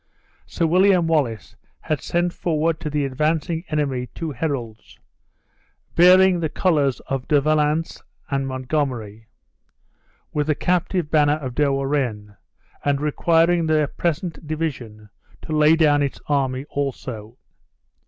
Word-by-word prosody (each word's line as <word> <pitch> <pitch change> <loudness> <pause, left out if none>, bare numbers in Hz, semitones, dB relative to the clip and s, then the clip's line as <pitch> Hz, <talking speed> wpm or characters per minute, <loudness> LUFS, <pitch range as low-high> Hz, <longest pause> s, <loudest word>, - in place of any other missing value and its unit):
Sir 170 - -1
William 180 +1 +4
Wallace 140 -10 -1 0.3
had 155 -3 -2
sent 175 0 -1
forward 165 -1 -1
to 155 - -4
the 150 -1 -1
advancing 155 +4 -1
enemy 140 -5 -1
two 165 -2 -4
heralds, 125 -6 -5 1.0
bearing 185 +1 +6
the 160 -2 -1
colors 145 -8 +1 0.3
De 150 -2 +4
Valence 155 +2 0 0.3
and 135 -1 -1
Montgomery, 130 -5 -3 1.1
with 150 0 -1
the 155 - +2
captive 180 -2 -1
banner 150 -1 +3
of 130 -5 -6
De 145 +2 +1
Warenne, 135 -7 -2 0.5
and 140 -1 +1
requiring 165 +3 +2
the 155 -2 +1
present 170 -1 -3
division 125 -10 -5 0.3
to 155 - -3
lay 155 +1 +5
down 150 -3 +3
its 140 -1 -2
army 135 -2 0
also. 125 -5 -5
150 Hz, 125 wpm, -22 LUFS, 135-165 Hz, 1.1 s, bearing